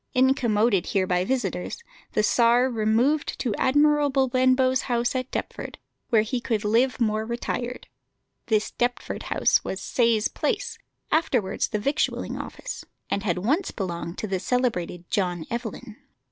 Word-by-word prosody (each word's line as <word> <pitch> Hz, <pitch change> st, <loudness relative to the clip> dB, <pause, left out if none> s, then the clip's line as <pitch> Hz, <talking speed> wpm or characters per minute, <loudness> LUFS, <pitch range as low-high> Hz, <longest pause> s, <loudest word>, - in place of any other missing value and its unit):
Incommoded 235 Hz, -, +3 dB
here 190 Hz, -2 st, +1 dB
by 180 Hz, -1 st, +1 dB
visitors, 235 Hz, -, -2 dB, 0.3 s
the 215 Hz, -, +2 dB
Czar 240 Hz, +3 st, +4 dB
removed 235 Hz, +7 st, +1 dB
to 240 Hz, -5 st, -1 dB
Admiral 290 Hz, +4 st, +3 dB
Benbow's 260 Hz, -1 st, +3 dB
house 240 Hz, 0 st, +1 dB
at 255 Hz, -1 st, -2 dB
Deptford, -, -, -5 dB, 0.3 s
where 220 Hz, -2 st, +4 dB
he 240 Hz, +2 st, -2 dB
could 220 Hz, -3 st, -1 dB
live 240 Hz, +5 st, +2 dB
more 215 Hz, -2 st, +1 dB
retired. 240 Hz, +1 st, -4 dB, 0.6 s
This 215 Hz, -2 st, +1 dB
Deptford 245 Hz, 0 st, -2 dB
house -, -, +3 dB
was 190 Hz, -, -4 dB
Sayes 230 Hz, 0 st, +2 dB
Place, 420 Hz, -4 st, -2 dB, 0.3 s
afterwards 245 Hz, -11 st, +1 dB
the -, -, -2 dB
Victualling 280 Hz, +8 st, -1 dB
Office, -, -, -6 dB, 0.3 s
and 200 Hz, -, 0 dB
had 185 Hz, -4 st, 0 dB
once 285 Hz, -, 0 dB
belonged 170 Hz, -3 st, -4 dB
to -, -, -3 dB
the 190 Hz, -2 st, -1 dB
celebrated 180 Hz, -7 st, -1 dB
John 180 Hz, -5 st, 0 dB
Evelyn. 235 Hz, -1 st, -5 dB
235 Hz, 140 wpm, -25 LUFS, 210-255 Hz, 0.6 s, Czar